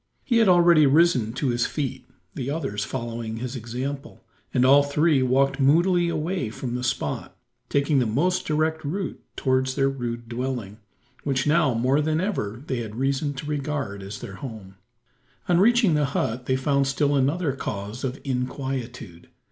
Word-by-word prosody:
He 235 - +1
had 225 - +4
already 170 -4 +6
risen 135 -6 +3
to 135 +1 -1
his 120 0 +1
feet 135 -3 -4 0.3
the 130 0 -4
others 105 -9 -2
following 115 -2 -4
his 125 +2 -5
example 130 +5 -5 0.3
and 125 -1 +3
all 140 +2 +7
three 145 0 +2
walked 135 +2 +2
moodily 170 +5 +3
away 160 - -2
from 120 +3 -5
the 125 0 -3
spot, 125 - -3 0.3
taking 140 0 +2
the 125 - +1
most 165 +12 0
direct 155 +1 0
route 180 +6 -4
towards 130 -1 +1
their 135 -1 +2
rude 120 -3 -5
dwelling, 120 -4 -4 0.4
which 135 -3 0
now 150 -4 +3
more 130 +5 +2
than 155 +1 0
ever 125 - -3
they 130 -5 -2
had 110 -2 -6
reason 135 +3 -1
to 135 - -6
regard 145 -8 -3
as 100 +1 -7
their 95 - -8
home. 110 -7 -8 0.7
On 175 -1 +3
reaching 230 -2 +4
the 150 -1 +2
hut 120 +3 -2
they 130 - +2
found 140 +1 +1
still 145 +1 +1
another 145 +4 +1
cause 105 -2 -5
of 130 +1 -3
inquietude. 125 - -4
135 Hz, 165 wpm, -24 LUFS, 120-150 Hz, 0.7 s, all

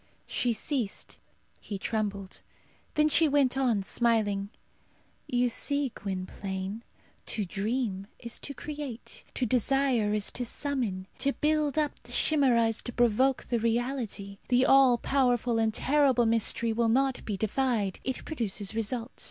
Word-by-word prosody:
She 245 - 0
ceased; 230 -1 -2 0.4
he 205 - -6
trembled. 200 -2 -3 0.5
Then 300 0 +4
she 315 +1 +4
went 275 -3 +3
on, 245 -7 +1
smiling, 205 -3 +1 0.8
"You 245 0 +2
see, 280 +3 -1
Gwynplaine, 190 +1 -5 0.5
to 210 - -1
dream 200 0 -2
is 235 -1 -5
to 280 - -7
create; 290 -6 -7
to 255 - 0
desire 250 -2 +2
is 210 -1 0
to 250 - -3
summon. 240 -7 -2
To 280 0 +2
build 305 -1 +1
up 300 -2 0
the - - -13
chimera 265 -7 +3
is 225 0 -1
to 245 - -5
provoke 245 +3 +2
the 235 - -1
reality. 230 -4 -2
The 250 +1 +4
all 265 -3 +6
powerful 245 -3 +1
and 220 -1 +2
terrible 265 0 +3
mystery 230 0 +1
will 230 0 +1
not 265 +2 +1
be 205 -3 -3
defied. 220 -2 0
It 260 -1 -3
produces 220 - -3
result. 225 +2 -2
235 Hz, 140 wpm, -29 LUFS, 210-270 Hz, 0.8 s, all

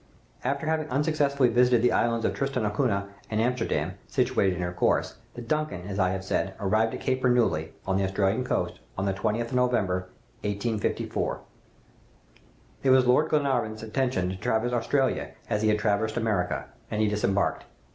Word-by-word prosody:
"After 140 +4 -1
having 155 -1 0
unsuccessfully 140 -1 +2
visited 120 0 +4
the 125 - +4
islands 115 -1 +1
of - - +1
Tristan 135 -4 -1
d'Acunha 105 -2 0 0.2
and 110 - -1
Amsterdam, 115 -9 0
situated 125 -8 +1
in 90 - -3
her 90 0 -3
course, 90 - +1 0.2
the 120 - -6
'Duncan,' 150 -8 -2
as 100 0 -4
I 95 -1 +3
have 95 0 -3
said, 95 0 -1
arrived 110 +3 +1
at - - -8
Cape 130 -1 0
Bernouilli, 120 -11 +2
on 95 0 +1
the 100 - +1
Australian 95 +5 +1
coast, - - -2 0.2
on 95 - -1
the 100 - +1
20th 115 +5 -1
of 125 0 +3
December, 90 -6 -1 0.3
1854. 105 +1 -2 1.4
"It 135 - +2
was 130 -1 +6
Lord 130 +6 +4
Glenarvan's 125 -7 0
intention 110 -5 0
to 95 - -4
traverse 110 +4 0
Australia 130 +3 0
as 105 - 0
he 110 - +2
had 105 - +3
traversed 110 +1 0
America, 105 -7 0 0.2
and 105 - -2
he 110 - +3
disembarked. 100 -1 0
110 Hz, 170 wpm, -27 LUFS, 100-125 Hz, 1.4 s, was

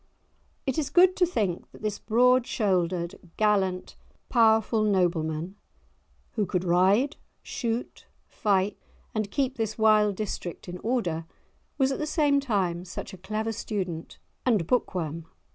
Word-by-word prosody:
It 265 +1 0
is 295 - -1
good 365 +1 +5
to 360 - +4
think 205 - -2
that - - -16
this 210 -1 -2
broad 250 +2 +3
shouldered, 180 -5 0 0.2
gallant, 195 -4 +1 0.3
powerful 225 -2 +4
nobleman, 175 -3 0 0.7
who 210 -4 -1
could 180 0 -1
ride, 190 - +3 0.3
shoot, 235 -2 -4 0.2
fight 200 -1 0 0.3
and 215 -2 -1
keep 265 +3 -1
this 220 -2 -2
wild 215 -2 +4
district 190 -4 -5
in 180 0 -6
order, 180 -9 -1 0.5
was 265 -1 +3
at 270 - -3
the 305 - -2
same 295 -3 +3
time 190 -10 -1
such 185 +2 -7
a - - -8
clever 215 +4 -2
student 185 -7 -4 0.3
and 215 -9 +2
book 245 +1 0
worm. 165 -1 -3
210 Hz, 140 wpm, -27 LUFS, 180-240 Hz, 0.7 s, good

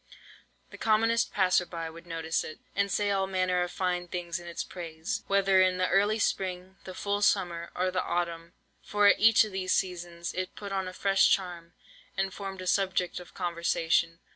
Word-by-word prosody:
The - - -11
commonest 225 +2 +2
passer 185 -2 +3
by 165 -1 -5
would 165 +2 -11
notice 165 -1 -1
it, 155 - -8 0.2
and 200 0 +1
say 205 -1 +1
all 195 -1 +1
manner 185 -1 +1
of 180 - -1
fine 180 -1 -1
things 175 -1 -4
in 175 - -11
its 170 - -4
praise, 170 +3 -5
whether 195 -1 +4
in 185 -1 +3
the 185 0 +1
early 205 +3 +3
spring, 185 -2 -2
the 185 - -8
full 205 0 -1
summer, 175 -5 +1
or 185 0 0
the 185 0 0
autumn, 170 -1 -3 0.3
for 205 0 +1
at 200 - +6
each 225 +1 +6
of 215 - -5
these 185 -1 -1
seasons 175 -2 -2
it 185 0 -4
put 200 -1 -7
on 190 -1 -1
a 185 - -6
fresh 195 0 +3
charm, 175 -3 -1 0.4
and 195 0 -1
formed 195 -2 -6
a - - -8
subject 185 -2 0
of 180 - -14
conversation. 170 -1 0
185 Hz, 190 wpm, -29 LUFS, 175-195 Hz, 0.4 s, at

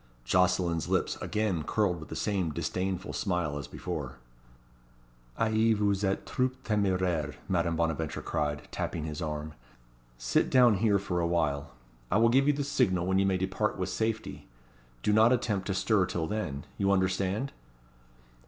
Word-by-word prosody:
Jocelyn's 90 +1 +2
lips - - +1
again 105 -6 -1
curled 90 +2 0
with 80 - -10
the - - -5
same 95 -5 0
disdainful 95 +5 -3
smile 90 -7 -1
as 70 - -7
before. - - -5 1.2
"Ah - - +1
I 110 0 +3
vous 100 -1 +1
etes 95 0 0
trop 130 0 0
temeraire!" 90 -8 0
Madame 85 -2 +1
Bonaventure 80 -1 -1
cried, 75 0 -2
tapping 80 - -3
his 75 +1 -5
arm. 75 -1 -4 0.6
"Sit - - +1
down 120 -5 +5
here 105 0 +3
for 95 -3 -2
awhile. 80 -7 0 0.3
I 105 - +2
will 115 +1 +5
give 135 +4 +4
you 145 - +5
the 145 0 -2
signal 95 -10 +1
when 95 +1 +2
you 100 - +3
may 95 -1 +2
depart 95 +3 -1
with 90 - -2
safety. 110 0 -3 0.6
Do 105 - +2
not 110 +3 +6
attempt 105 -6 0
to 95 - -1
stir 100 -2 +2
till 85 -2 -2
then. 80 -8 -3
You 100 0 +2
understand?" 95 +6 0
95 Hz, 160 wpm, -29 LUFS, 85-105 Hz, 1.2 s, not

